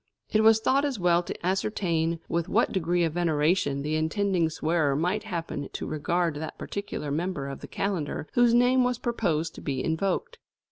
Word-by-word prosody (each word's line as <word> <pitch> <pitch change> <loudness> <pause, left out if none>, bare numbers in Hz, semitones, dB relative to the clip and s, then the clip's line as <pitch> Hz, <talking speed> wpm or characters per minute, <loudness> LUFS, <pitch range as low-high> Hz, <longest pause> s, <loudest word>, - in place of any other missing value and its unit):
It 215 - +3
was 220 0 +6
thought 270 +5 +2
as 280 -4 -1
well 175 -1 +3
to 175 - -7
ascertain 175 -4 0
with 170 0 -1
what - - +2
degree 175 -1 +1
of 165 -2 0
veneration 155 -3 +1
the 150 +1 -2
intending 170 +2 +1
swearer 155 -2 +1
might 180 +8 0
happen 165 -7 -4
to - - -4
regard 170 +2 0
that 155 +1 -6
particular 200 -7 -5
member 155 -2 -2
of 135 -1 -6
the - - -8
calendar 175 -6 -3
whose 240 -1 +4
name 250 +1 +4
was 250 -1 0
proposed 170 -10 -1
to - - -10
be 135 -3 -2
invoked. 195 - -1
175 Hz, 180 wpm, -27 LUFS, 155-205 Hz, -, was